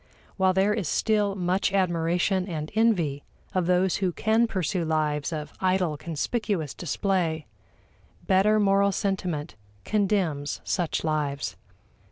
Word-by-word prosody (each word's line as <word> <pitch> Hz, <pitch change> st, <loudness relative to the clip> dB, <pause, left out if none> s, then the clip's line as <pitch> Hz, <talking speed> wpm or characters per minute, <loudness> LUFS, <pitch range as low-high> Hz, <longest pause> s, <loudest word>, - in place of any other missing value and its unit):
While 190 Hz, -1 st, +3 dB
there 195 Hz, +3 st, +3 dB
is 210 Hz, -6 st, -2 dB
still 210 Hz, 0 st, +1 dB
much 185 Hz, +1 st, 0 dB
admiration 180 Hz, 0 st, +1 dB
and 155 Hz, -4 st, -4 dB
envy 180 Hz, -11 st, +1 dB, 0.3 s
of 185 Hz, -2 st, 0 dB
those 180 Hz, 0 st, +2 dB
who 190 Hz, -2 st, 0 dB
can 220 Hz, +6 st, +2 dB
pursue 185 Hz, -3 st, -1 dB
lives 155 Hz, -1 st, 0 dB
of 150 Hz, -2 st, -5 dB
idle 185 Hz, -4 st, +1 dB
conspicuous 165 Hz, -, -2 dB
display, 170 Hz, -2 st, -1 dB, 0.8 s
better 205 Hz, +3 st, +4 dB
moral 200 Hz, 0 st, +3 dB
sentiment 180 Hz, -6 st, -2 dB, 0.3 s
condemns 190 Hz, -9 st, 0 dB
such 175 Hz, -3 st, -1 dB
lives. 150 Hz, -3 st, -1 dB
185 Hz, 120 wpm, -26 LUFS, 160-200 Hz, 0.8 s, better